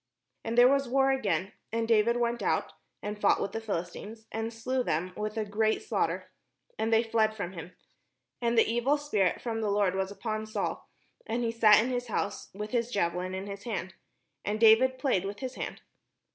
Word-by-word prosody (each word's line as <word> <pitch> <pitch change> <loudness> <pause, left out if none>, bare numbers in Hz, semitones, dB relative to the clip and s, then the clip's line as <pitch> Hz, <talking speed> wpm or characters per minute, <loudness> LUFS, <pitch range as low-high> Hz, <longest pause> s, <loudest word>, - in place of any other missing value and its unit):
And 225 +1 -3
there 245 +1 +9
was 275 -1 +2
war 270 +1 +3
again: 205 -7 0 0.2
and 230 0 -1
David 230 +1 +3
went 235 0 0
out, - - 0 0.3
and 210 0 -5
fought 205 - +4
with 200 - -2
the 225 - -4
PhiHstines, 210 +2 -5
and 225 +1 -3
slew 255 +3 -1
them 180 -1 -1
with 215 +1 -4
a 220 - 0
great 215 +1 0
slaughter; - - -1 0.5
and 225 - 0
they 225 +1 +5
fled 220 -1 +1
from 195 -4 -4
him. 175 0 -9 0.7
And 235 0 +1
the 225 - +6
evil 240 +6 +2
spirit 215 -11 0
from 225 -2 -2
the 215 - 0
Lord 200 -2 +2
was 190 0 -1
upon 215 +1 -4
Saul, 215 - -3 0.4
as 225 +2 -1
he 230 - 0
sat 215 -2 +6
in 255 - -2
his 245 0 -2
house 200 -2 -3
with 210 +2 -6
his 235 -1 0
javelin 180 -2 -1
in 190 +1 -4
his 200 0 -8
hand: 190 -5 -3 0.5
and 210 +1 -2
David 230 +4 +6
played 255 -8 +1
with 200 +1 -5
his 260 +1 -5
hand. - - -6
220 Hz, 200 wpm, -29 LUFS, 205-235 Hz, 0.7 s, there